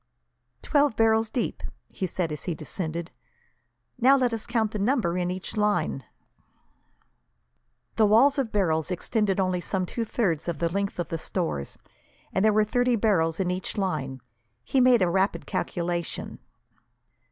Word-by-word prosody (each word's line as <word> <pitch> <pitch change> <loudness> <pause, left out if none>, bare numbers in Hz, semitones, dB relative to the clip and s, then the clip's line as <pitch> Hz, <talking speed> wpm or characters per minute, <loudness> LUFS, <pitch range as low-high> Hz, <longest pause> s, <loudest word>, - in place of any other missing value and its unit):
"Twelve 290 -5 +2
barrels 225 0 +3
deep," 245 - -2 0.3
he 185 - -4
said, 175 -2 -2
as 150 -2 -5
he 175 - -2
descended. 165 +2 -4 0.9
"Now, 265 +3 +6
let 250 -3 +1
us 225 -1 -4
count 225 -3 0
the 215 - -4
number 205 -5 +1
in 180 -1 -1
each 185 +4 -5
line." 210 -1 0 1.9
The 220 -2 +5
wall 235 +7 +5
of 265 -6 -1
barrels 160 -6 +1
extended 195 +2 0
only 185 -2 0
some 185 +1 -1
two 230 +6 -3
thirds 190 -9 -1
of 170 -3 -2
the 170 +1 0
length 200 +3 -2
of 175 - -3
the 165 - -3
stores, 160 - -3 0.6
and 190 - +1
there 215 - +5
were 215 0 +3
thirty 245 +2 +2
barrels 180 -7 +1
in 180 -2 0
each 185 +4 -4
line. 150 -9 -2 0.4
He 265 - +1
made 245 -5 +5
a - - +3
rapid 190 +3 0
calculation. 175 -1 -3
195 Hz, 155 wpm, -26 LUFS, 170-225 Hz, 1.9 s, Now